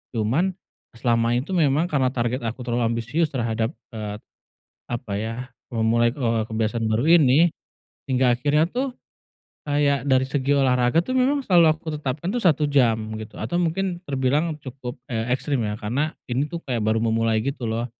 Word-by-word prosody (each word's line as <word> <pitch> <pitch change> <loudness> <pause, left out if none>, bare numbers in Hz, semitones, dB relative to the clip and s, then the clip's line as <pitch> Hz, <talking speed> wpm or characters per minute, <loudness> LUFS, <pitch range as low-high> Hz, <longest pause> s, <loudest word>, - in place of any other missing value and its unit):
Cuman 145 - +1 0.4
selama 115 0 +1
itu 130 +9 -2
memang 160 0 +2
karena 135 -3 +2
target 125 0 -1
aku 120 +2 -5
terlalu 120 -1 0
ambisius 125 +8 0
terhadap, 115 -1 -2 0.2
eee, 105 -2 -5 0.7
apa, 120 -4 -5
ya, 115 +4 -4 0.2
memulai, 115 +1 +2
eee, 115 -5 0
kebiasaan 110 +1 -1
baru 125 +11 +4
ini, 155 +4 +5 0.6
hingga 125 -3 +2
akhirnya 150 +5 +2
tuh 255 +3 -2 0.8
kayak 145 -2 +1
dari 130 -1 +3
segi 140 +1 0
olahraga 125 +1 +2
tuh 255 - -2
memang 265 +2 +2
selalu 175 -3 +6
aku 160 - -19
tetapkan 150 +7 -3
tuh 245 - -1
1 155 -4 +3
jam, 125 -6 +3 0.2
gitu, 110 - -10
atau 175 0 -2
mungkin 175 +1 -1
terbilang 145 +4 0
cukup, 130 -3 -8
eee, 115 +1 -2
ekstrim, 135 -2 -2
ya, 105 -1 -2
karena 130 +8 -2
ini 135 +4 -1
tuh 170 - -4
kayak 120 -4 -1
baru 110 +1 +1
memulai 115 0 +1
gitu 130 -4 -3
loh, 115 +2 -1
130 Hz, 165 wpm, -23 LUFS, 115-150 Hz, 0.8 s, selalu